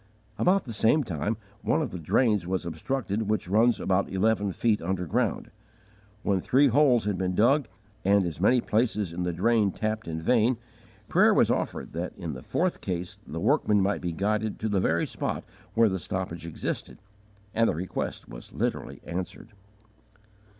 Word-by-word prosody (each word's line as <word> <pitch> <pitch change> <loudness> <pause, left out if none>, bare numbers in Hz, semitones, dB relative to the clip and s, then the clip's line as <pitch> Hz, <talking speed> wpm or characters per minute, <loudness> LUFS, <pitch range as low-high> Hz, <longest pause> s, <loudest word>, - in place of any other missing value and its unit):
About 190 +2 +3
the 120 - -6
same 115 +8 +3
time 100 - -2 0.2
one - - +1
of 145 -9 -2
the 90 - -6
drains 105 - +2
was 95 -1 -1
obstructed 105 - -2
which 110 -4 0
runs 110 +5 +3
about 95 +1 +1
eleven 100 +1 +1
feet 110 +3 +1
underground. 90 -1 -1 0.7
When 95 -2 +1
three 140 +7 +4
holes 125 -4 +4
had 100 -3 -1
been 90 -1 -1
dug 130 +5 +3 0.4
and 100 0 +4
as 85 -1 -5
many 120 +5 +4
places 105 -6 0
in 90 - -4
the 90 0 0
drain 105 +4 +2
tapped 110 +1 -3
in 80 -1 -3
vain, 115 +7 +3 0.5
prayer - - +4
was - - +4
offered - - -2
that 85 +2 -4
in 85 -5 -5
the 65 - -8
fourth 180 - -1
case 90 -2 -4
the 80 - -5
workmen 105 - +3
might 100 +1 +1
be 90 - -2
guided 105 +5 -1
to 110 - 0
the 100 -2 +1
very 85 -2 +1
spot - - -3 0.3
where 115 0 +5
the 95 -2 -1
stoppage 85 -1 -4
existed 85 - -4 0.6
and 115 0 +3
the - - 0
request 90 +3 -4
was - - -10
literally - - -3
answered. 90 +1 -5
100 Hz, 170 wpm, -27 LUFS, 90-115 Hz, 0.7 s, where